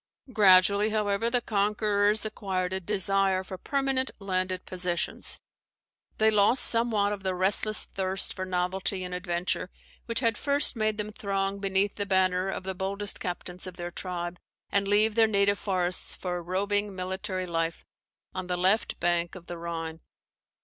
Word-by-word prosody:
Gradually, 200 +1 +5
however, 210 +1 0
the 245 0 +1
conquerors 210 0 +2
acquired 190 -4 -3
a 190 - 0
desire 195 0 +1
for 185 -1 -8
permanent 270 -2 0
landed 185 -2 -2
possessions. 180 -1 -1 0.8
They 220 0 +4
lost 210 +4 +4
somewhat 225 -3 +3
of 200 - -6
the 190 -1 -2
restless 200 +3 +4
thirst 190 0 -2
for 185 - -5
novelty 185 +1 -1
and 180 0 -5
adventure 180 0 -2 0.4
which 230 +1 0
had 230 -2 +1
first 285 -1 +3
made 215 -1 0
them 210 0 -4
throng 195 -1 -2
beneath 195 0 0
the 205 -1 -2
banner 185 -1 +2
of 195 - -4
the 190 0 -3
boldest 195 +2 -1
captains 180 0 -5
of 185 -1 -9
their 175 0 -5
tribe, 175 -1 -5 0.3
and 200 0 +1
leave 210 +2 +4
their 225 0 +4
native 200 -1 +2
forests 185 -2 -1
for 180 -1 -4
a - - -5
roving 200 +3 -1
military 185 0 -4
Life 165 -1 -3 0.5
on 185 -1 -5
the 180 -1 -1
left 190 +5 +1
bank 175 0 0
of 175 -2 -11
the 175 -1 -7
Rhine. 165 -1 -5
195 Hz, 160 wpm, -27 LUFS, 180-210 Hz, 0.8 s, Gradually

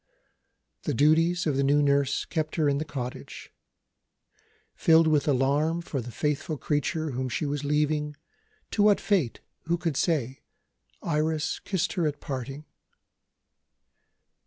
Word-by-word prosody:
The - - -2
duties 165 +4 +3
of 145 -4 0
the 140 - +2
new 145 +2 +3
nurse 140 -1 +2
kept 155 -2 -3
her 155 -3 +2
in 140 0 +1
the 155 - -3
cottage. 125 -4 -7 1.2
Filled 165 0 +5
with 155 -2 +2
alarm 145 +5 +2
for 140 -5 -3
the 120 - -8
faithful 150 +4 -2
creature 150 +2 -1
whom 130 0 -3
she 140 +6 -2
was 145 0 -2
leaving 150 0 0 0.6
to 210 - 0
what 205 -1 +5
fate, 180 - 0 0.2
who 170 +1 +1
could 165 -4 -2
say? 135 -5 0 0.6
Iris 155 -1 0
kissed 180 -3 -2
her 175 -5 +1
at 145 -1 -3
parting. 135 +2 -6
150 Hz, 135 wpm, -27 LUFS, 140-160 Hz, 1.2 s, Filled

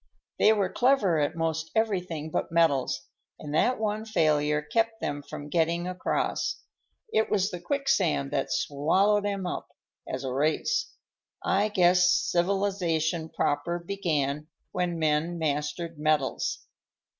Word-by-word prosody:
They 215 - +6
were 200 -4 +1
clever 245 - +3
at 145 +3 0
most 160 0 -1
everything 180 -8 -1
but - - -2
metals; 140 -6 +2 0.3
and 150 -1 -7
that 250 +10 +2
one 215 0 -1
failure 150 -7 +1
kept 225 +7 0
them 145 0 -3
from 145 +1 -8
getting 170 +2 0
across. 180 0 -2 0.5
It 220 - +2
was 200 -1 +1
the 180 - -5
quicksand 195 - 0
that 135 - -1
swallowed 195 +9 +2
'em 200 -2 -2
up, 180 - -4 0.4
as 130 +1 -4
a 130 -1 -3
race. 155 - 0 0.5
I 200 +2 +2
guess 180 -3 +4
civilization 175 -3 0
proper 145 +4 -1
began 155 -6 -2 0.2
when 180 -2 -1
men 155 +2 +1
mastered 155 +1 -2
metals." 150 -3 0
170 Hz, 130 wpm, -27 LUFS, 150-200 Hz, 0.5 s, They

